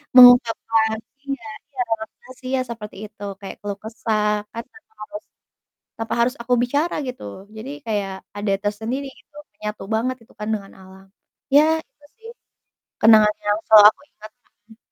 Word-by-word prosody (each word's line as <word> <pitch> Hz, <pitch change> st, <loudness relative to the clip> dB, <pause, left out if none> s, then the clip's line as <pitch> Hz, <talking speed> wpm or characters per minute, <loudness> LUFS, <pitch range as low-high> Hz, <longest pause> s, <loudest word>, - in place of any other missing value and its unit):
Mengungkapkan 230 Hz, -3 st, +6 dB, 0.2 s
iya 275 Hz, +1 st, -5 dB, 0.2 s
iya, 275 Hz, -3 st, -14 dB
relaksasi, 225 Hz, +4 st, -6 dB
iya 265 Hz, -1 st, +1 dB
seperti 225 Hz, -4 st, -8 dB
itu, 205 Hz, -1 st, -14 dB, 0.2 s
kayak 195 Hz, -, -7 dB
keluh 200 Hz, -1 st, -4 dB
kesah 215 Hz, -1 st, 0 dB
kan 230 Hz, 0 st, -5 dB
tanpa 440 Hz, 0 st, -20 dB
harus, 310 Hz, +3 st, -8 dB, 0.7 s
tanpa 225 Hz, -1 st, -3 dB
harus 250 Hz, +3 st, +2 dB
aku 245 Hz, +1 st, 0 dB
bicara 285 Hz, +7 st, 0 dB
gitu. 250 Hz, -, -7 dB, 0.3 s
Jadi 220 Hz, +5 st, -7 dB, 0.2 s
kayak 200 Hz, -3 st, -3 dB
ada 205 Hz, -1 st, -1 dB
tersendiri 225 Hz, +7 st, -3 dB
gitu, 295 Hz, -, -28 dB, 0.2 s
menyatu 210 Hz, -1 st, -5 dB
banget 255 Hz, +3 st, 0 dB
gitu -, -, -23 dB
kan 210 Hz, -, -4 dB
dengan 200 Hz, -2 st, -5 dB
alam. 190 Hz, 0 st, -15 dB, 0.5 s
Ya, 290 Hz, -, +8 dB, 0.2 s
itu 295 Hz, -, -26 dB
sih 455 Hz, +1 st, -12 dB, 0.7 s
kenangan 215 Hz, -1 st, +7 dB
yang 205 Hz, 0 st, +2 dB
selalu 215 Hz, -1 st, +9 dB
aku -, -, -26 dB
ingat. 215 Hz, 0 st, -13 dB, 0.4 s
Mhm. 220 Hz, -, -16 dB
225 Hz, 155 wpm, -22 LUFS, 210-255 Hz, 0.7 s, selalu